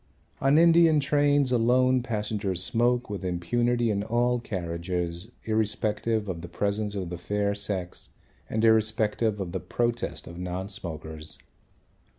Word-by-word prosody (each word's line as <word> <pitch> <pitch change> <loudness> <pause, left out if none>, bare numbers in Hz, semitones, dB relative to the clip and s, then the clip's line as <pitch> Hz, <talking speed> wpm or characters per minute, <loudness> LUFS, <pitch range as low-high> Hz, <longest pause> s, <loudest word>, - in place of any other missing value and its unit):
On 135 +2 +4
Indian 165 -1 +6
trains 145 -1 +2
alone 125 +2 +3
passengers 105 -5 -2
smoke 120 +2 +1
with 100 -2 -5
impunity 120 +7 0
in 100 -1 0
all 120 +3 +1
carriages 85 -1 -4
irrespective 110 0 0
of 85 -3 -4
the 85 - -7
presence 105 +2 -2
of 95 -3 -4
the 90 - -5
fair 100 +2 -1
sex 100 -3 -3 0.4
and 110 +1 +1
irrespective 110 -1 +2
of 95 -3 -4
the 95 - -2
protest 120 -9 -2
of 85 +1 -9
non 90 +2 -4
smokers. 80 -5 -6
105 Hz, 135 wpm, -27 LUFS, 90-120 Hz, 0.4 s, Indian